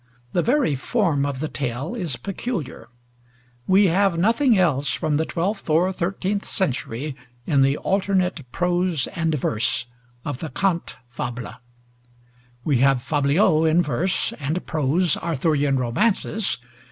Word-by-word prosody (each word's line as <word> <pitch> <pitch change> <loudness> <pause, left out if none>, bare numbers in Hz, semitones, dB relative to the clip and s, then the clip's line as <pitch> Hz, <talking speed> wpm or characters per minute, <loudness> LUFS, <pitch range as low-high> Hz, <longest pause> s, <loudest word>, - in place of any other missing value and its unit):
The 175 - +2
very 255 - +2
form 145 - 0
of 140 -1 -4
the 155 - -1
tale 135 - -4
is 175 - -3
peculiar; 190 - -5 0.8
we 195 +2 +5
have 190 0 +2
nothing 230 +6 +3
else 145 -6 +2
from 150 -2 0
the 160 - 0
twelfth 195 +4 -3
or 175 +5 +3
thirteenth 195 +3 -2
century 140 - -2 0.3
in 140 -5 +3
the 135 +2 +3
alternate 185 -8 0
prose 175 -3 +1
and 165 -3 0
verse 120 -4 0 0.4
of 145 -4 -4
the 160 - -5
cante 175 +4 -1 0.2
fable. 120 -2 -5 1.1
We 140 -6 +2
have 135 -1 +3
fabliaux 155 +4 +3
in 170 +3 +3
verse, 170 +7 0
and 155 +5 -2
prose 155 +3 +1
Arthurian 145 -3 +1
romances. 195 - 0
160 Hz, 130 wpm, -23 LUFS, 140-185 Hz, 1.1 s, we